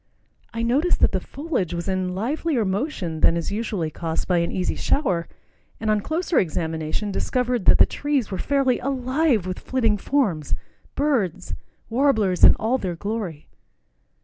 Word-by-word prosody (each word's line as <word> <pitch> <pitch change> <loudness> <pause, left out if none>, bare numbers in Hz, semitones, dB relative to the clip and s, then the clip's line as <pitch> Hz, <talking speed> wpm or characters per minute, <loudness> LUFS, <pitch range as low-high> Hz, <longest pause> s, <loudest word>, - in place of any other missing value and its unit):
I 230 0 -3
noticed 280 +10 +2
that - - +5
the - - 0
foliage 265 - -3
was 170 +2 -4
in 185 -1 -1
livelier 260 - 0
motion 190 - -2
than 165 - +4
is 170 - -3
usually 205 -7 -2
caused 165 +1 -3
by 180 -2 +3
an 170 - -1
easy 180 -1 -1
shower, 185 - 0 0.5
and 215 0 0
on 210 -1 +2
closer 330 - 0
examination 160 +3 -2
discovered 250 0 -1
that - - +6
the - - +7
trees 285 -7 -1
were 190 - -3
fairly 275 -3 +1
alive 260 - +1
with 185 0 -4
flitting 225 -5 +1
forms, 195 - 0 0.4
birds—warblers 225 - 0
in - - +9
all 240 +5 0
their 180 -3 -3
glory. 200 -5 -4
215 Hz, 150 wpm, -23 LUFS, 180-265 Hz, 0.5 s, in